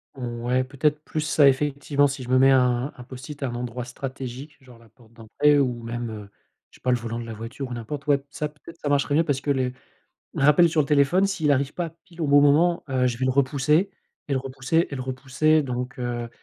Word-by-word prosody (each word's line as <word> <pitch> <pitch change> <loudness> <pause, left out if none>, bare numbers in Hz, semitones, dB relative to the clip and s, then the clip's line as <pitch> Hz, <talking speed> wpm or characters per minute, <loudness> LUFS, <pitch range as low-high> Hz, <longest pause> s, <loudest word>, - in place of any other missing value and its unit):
Ouais, 120 0 -1
peut-être 145 +3 0
plus 155 - -3
ça, 150 -2 +4
effectivement. 145 +1 +2
Si 135 -1 -5
je 125 - -9
me 130 0 +4
mets 135 +1 +6
un 125 +1 +2
un 125 - -9
Post-it 130 +4 -10
à - - 0
un 120 - -5
endroit 120 0 -5
stratégique, 130 +2 -7
genre, 125 -3 -16
la 115 -1 -20
porte 115 0 -23
d'entrée 140 +6 +2
ou 120 -3 -1
même, 120 0 -4
heu, 105 -2 -8 0.4
je - - -18
sais - - -31
pas, 125 - -2
le 125 - +3
volant 115 0 -5
de 115 - -6
la 115 - -7
voiture 125 +5 -7
ou - - -5
n'importe, 140 +6 -6
ouais, 140 -1 +2
ça, 150 -1 -3
peut-être, 150 +2 -15
ça 145 - -3
marcherait 145 -1 +1
mieux 165 - +4
parce 145 -4 -1
que 145 - -1
les 130 -2 0 0.6
les - - -1
rappels 150 +4 +6
sur 155 -1 +2
le - - -2
téléphone, 150 +6 +3
s'il 175 -7 0
arrive 140 +1 -1
pas 175 -2 -3
pile 170 -2 -11
au 155 - 0
bon 145 0 +6
moment, 165 +5 +3
heu, 130 -1 +2
je 120 -1 -2
vais 130 - -3
le 130 - +2
repousser 145 +7 +2 0.4
et 140 - -1
le - - +2
repousser 135 +5 0
et 140 - -3
le 130 - -4
repousser 135 +4 +1
donc, 125 +1 -4
heu 120 -1 -3
135 Hz, 245 wpm, -24 LUFS, 125-145 Hz, 0.6 s, mets